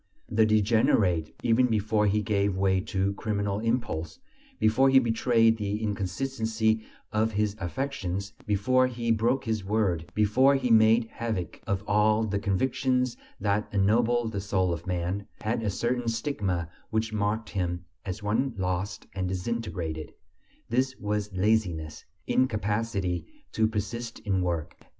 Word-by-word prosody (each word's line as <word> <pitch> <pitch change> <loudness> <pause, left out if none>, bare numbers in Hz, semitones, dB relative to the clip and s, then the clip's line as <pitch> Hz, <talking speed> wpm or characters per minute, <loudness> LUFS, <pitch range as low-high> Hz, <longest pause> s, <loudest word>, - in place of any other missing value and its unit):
The 110 0 +3
degenerate, 105 -6 +2
even 125 +2 +4
before 110 -1 +1
he 105 +1 +1
gave 100 -2 +1
way 95 -1 +2
to 100 -1 -1
criminal 100 -1 -2
impulse, 110 -9 -2 0.4
before 110 +5 +4
he 135 - +6
betrayed 115 -2 +3
the 105 0 -2
inconstancy 110 +2 -1 0.3
of 110 +1 +1
his 105 0 0
affections, 100 -2 -3
before 130 +6 +3
he 120 -2 -2
broke 120 +4 +1
his 110 -3 -1
word, 95 -5 0
before 125 +7 +4
he 125 -3 0
made 110 +1 +6
havoc 110 -8 -4
of 100 +1 -1
all 105 +2 +3
the 100 -2 -1
convictions 125 +5 0 0.2
that 105 +1 0
ennoble 115 +4 +2
the 100 -3 -3
soul 95 -3 +1
of 85 +2 -7
man, 90 +3 -2
had 110 +2 -1
a 110 - 0
certain 120 +4 -1
stigma 105 - -1 0.2
which 110 0 -1
marked 105 +1 -1
him 90 -2 -2 0.2
as 95 +3 -5
one 115 +5 0
lost 95 +2 -2
and 95 -1 -2
disintegrated: 90 -6 -4 0.5
this 130 +2 0
was 105 0 -2
laziness, 95 -6 0 0.2
incapacity 105 - -1
to 110 0 +2
persist 115 +2 -4
in 95 -3 0
work. 85 -4 -2
105 Hz, 135 wpm, -27 LUFS, 95-115 Hz, 0.5 s, he